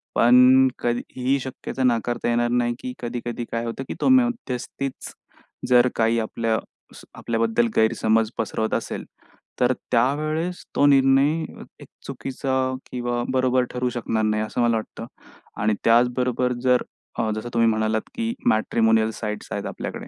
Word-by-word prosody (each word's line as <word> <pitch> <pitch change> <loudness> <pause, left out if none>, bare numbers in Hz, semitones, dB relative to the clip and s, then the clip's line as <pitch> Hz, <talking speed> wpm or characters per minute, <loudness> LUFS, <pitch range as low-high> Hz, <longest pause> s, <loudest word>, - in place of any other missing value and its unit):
पण 125 +2 +6
कधी 120 0 0 0.2
ही 130 +2 +1
शक्यता 130 0 -5
नाकारता 120 -1 0
येणार 120 0 +1
नाही, 120 0 +1
की 125 - -6
कधी-कधी 120 0 -4
काय 115 0 -2
होतं, 115 +3 -4
की - - -4
तो - - +3
मध्यस्थीच 230 - -1 0.6
जर 125 0 +6
काही 115 0 +2
आपल्या 115 0 -1 0.4
स - - -13
आपल्याबद्दल 115 0 0
गैरसमज 110 0 +2
पसरवत 110 0 -2
असेल, - - -4 0.5
तर 125 +1 +3 0.2
त्यावेळेस 155 +8 0
तो - - +4
निर्णय 135 +1 +5 0.5
एक - - -12 0.2
चुकीचा 135 0 -3 0.4
किंवा 120 -1 -2
बरोबर 130 -1 +2
ठरू 125 0 -1
शकणार 115 -2 -2
नाही. 110 0 0
असं 110 +3 -3
मला 115 -1 +3
वाटतं 110 - -7 0.6
आणि 110 +1 +2
त्याचबरोबर 125 +1 +2
जर, 125 -1 +3 0.5
जसं 110 +3 -5
तुम्ही 115 -1 +3
म्हणालात, 110 0 0
की 230 0 -2
मॅट्रिमोनियल 110 0 +2
साइट्स. 105 -1 -6
आहेत - - -3
आपल्याकडे - - -6
120 Hz, 140 wpm, -23 LUFS, 115-130 Hz, 0.6 s, पण